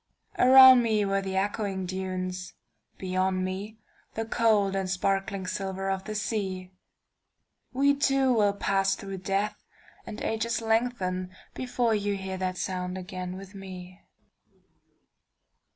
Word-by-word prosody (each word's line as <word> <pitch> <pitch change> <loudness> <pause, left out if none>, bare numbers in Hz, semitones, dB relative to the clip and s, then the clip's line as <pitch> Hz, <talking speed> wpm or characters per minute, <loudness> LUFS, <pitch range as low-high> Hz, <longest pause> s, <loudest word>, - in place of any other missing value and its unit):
Around 260 0 +9
me 215 -3 +1
were 195 0 0
the 190 -1 -4
echoing 195 -1 -1
dunes, 185 0 -4 0.4
beyond 185 0 0
meThe 215 +3 -7
cold 210 -4 +3
and 190 -1 -1
sparkling 195 +1 -1
silver 195 0 -3
of 190 0 -3
the 215 - -5
sea—We 205 +7 -4
two 270 -2 +3
will 205 -3 +3
pass 195 -1 +1
through 195 -1 -7
death 200 +3 -2 0.4
and 215 - -7
ages 225 +1 -1
lengthenBefore 225 +1 -1
you 205 0 -1
hear 190 -1 -5
that 185 -1 -2
sound 180 -1 -3
again 185 0 -6
with 195 +1 -11
me. 185 -1 -10
195 Hz, 115 wpm, -27 LUFS, 185-215 Hz, 0.4 s, Around